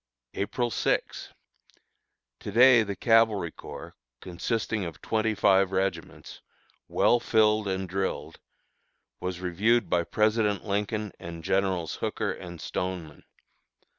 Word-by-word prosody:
April 120 +4 -2
6. - - -1 1.1
To - - -6
day 120 +2 +7
the 100 -2 -3
Cavalry 110 -7 +3
Corps, - - -10 0.3
consisting 105 - -2
of 85 -3 -7
twenty 110 0 0
five 95 -1 +3
regiments, 95 -3 -3 0.5
well 120 - +3
filled 110 -2 +2
and 95 0 -2
drilled, 95 +1 -3 0.8
was 90 -1 -4
reviewed 105 +7 +1
by 85 -1 +3
President 105 +1 +1
Lincoln 105 +1 -2
and 85 -1 -8
Generals 95 -3 0
Hooker - - -2
and 85 -1 -8
Stoneman. 85 -2 -5
100 Hz, 110 wpm, -27 LUFS, 90-110 Hz, 1.1 s, day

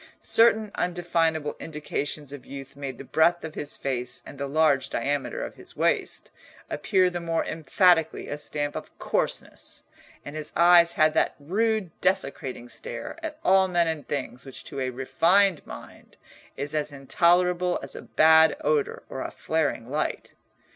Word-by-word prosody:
Certain 220 -2 +4
undefinable 165 -4 0
indications 150 -2 -4
of 145 - -9
youth 135 0 -9
made 135 -3 -6
the - - -8
breadth 160 +5 +2
of 160 - -7
his 145 - -4
face 125 -2 -3
and 140 - -11
the 140 - -2
large 140 -2 +2
diameter 140 +3 -2
of - - -8
his - - -11
waist - - 0 0.4
appear 185 +4 +2
the 175 - -3
more 165 -1 -1
emphatically 165 +1 +2
a - - -3
stamp 145 0 -2
of - - -8
coarseness, - - -3 0.4
and 145 - -7
his 155 -1 -5
eyes 170 0 +6
had 155 0 +3
that - - +1
rude 205 +4 0
desecrating 135 -9 -1
stare 120 - -7
at 315 -2 -5
all 190 0 +5
men 175 -2 +2
and 160 -3 -3
things 130 -3 -4
which 135 -2 -6
to - - -6
a 130 -1 -1
refined 170 +8 +2
mind - - -12 0.4
is 145 +2 -4
as 150 -1 -1
intolerable 175 +5 +2
as - - -5
a - - -7
bad 160 0 +5
odour 150 -2 0
or 130 - -6
a - - -3
flaring 155 -7 -1
light. 150 +4 -3
155 Hz, 160 wpm, -26 LUFS, 140-175 Hz, 0.4 s, eyes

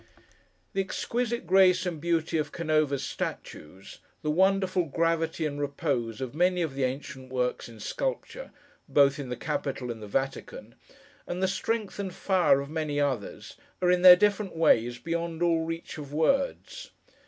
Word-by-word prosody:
The 195 - +1
exquisite 235 +3 -2
grace 185 +1 +4
and 170 -4 -4
beauty 165 -1 0
of 150 -1 -3
Canova's 155 -4 0
statues; 95 +6 -7 0.2
the 150 - 0
wonderful 190 +1 +2
gravity 165 +1 0
and 145 -1 -3
repose 140 -6 -2
of 130 -1 -4
many 180 +2 +2
of 155 -5 -3
the 135 -1 0
ancient 130 0 -6
works 125 -2 -2
in 115 -1 -13
sculpture, - - -4 0.4
both 140 0 +4
in 135 -3 -5
the 125 - -3
Capitol 135 -4 -3
and 115 -2 -8
the 105 - -7
Vatican; 135 +6 -4 0.5
and 180 +2 -3
the - - +4
strength 210 +2 -2
and 190 -3 -4
fire 180 -8 +3
of 140 - -7
many 155 -2 -2
others; 135 -7 -3 0.2
are, 180 -1 +3
in 180 0 +2
their 180 -1 +11
different 205 0 0
ways, 120 -7 +3
beyond 165 +4 -3
all 165 -1 +2
reach 165 0 -6
of 145 -2 -8
words. 270 - -1
160 Hz, 160 wpm, -28 LUFS, 140-185 Hz, 0.5 s, their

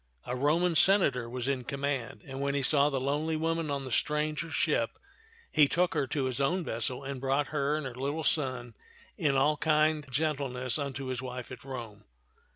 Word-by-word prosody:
A 125 - -3
Roman 160 +7 +2
senator 140 -11 +4
was 125 +1 -4
in 135 -2 0
command; 140 -1 -3
and 135 0 -6
when 140 0 0
he 140 - 0
saw 145 +2 +4
the 135 -2 -1
lonely 150 +4 -1
woman 165 0 -1
on 140 -1 -2
the 130 - -7
stranger 150 +5 0
ship, 300 - 0 0.5
he 150 -2 +5
took 180 +5 +1
her 145 -4 0
to 140 -1 -1
his 130 +1 -1
own 175 +7 +1
vessel 125 +1 -2
and 135 -2 -5
brought 135 +2 +1
her 145 -1 0
and 155 -2 -3
her 130 - -5
little 140 +5 -3
son 130 -6 +1 0.4
in 140 -2 +1
all 150 +3 +3
kind 155 -1 +2
gentleness 135 -2 0
unto 140 -1 -4
his 130 -1 -3
wife 125 -1 -6
at 125 - -9
Rome. 120 -6 -8
140 Hz, 190 wpm, -30 LUFS, 130-150 Hz, 0.5 s, he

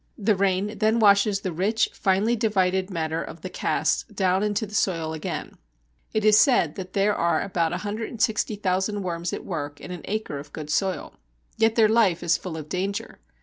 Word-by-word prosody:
The 210 0 +2
rain 195 +2 0
then 220 +1 +3
washes 200 -2 +4
the 185 - -3
rich, 205 +7 +1
finely 200 +4 +1
divided 190 -4 +1
matter 160 -3 -2
of 165 0 -8
the 185 - -6
casts - - 0
down 190 -2 +1
into 210 +1 0
the 210 - -13
soil 165 -6 0
again. 155 - -5 0.5
It 215 -1 0
is 215 0 +7
said 225 - +4
that 185 -1 -8
there 205 +1 +2
are 170 -3 +1
about 170 -4 0
160,000 205 0 -1
worms 170 -1 -3
at - - -5
work 145 -5 -5
in 180 - -9
an 180 -3 -6
acre 215 -9 -3
of 145 +1 -12
good 155 -1 -6
soil. 190 +3 -1 0.4
Yet 225 0 +2
their 225 -2 +5
life 215 -7 +3
is 170 -1 +3
full 175 -4 -5
of 155 -2 -7
danger. 195 +4 -3
195 Hz, 185 wpm, -25 LUFS, 175-210 Hz, 0.5 s, is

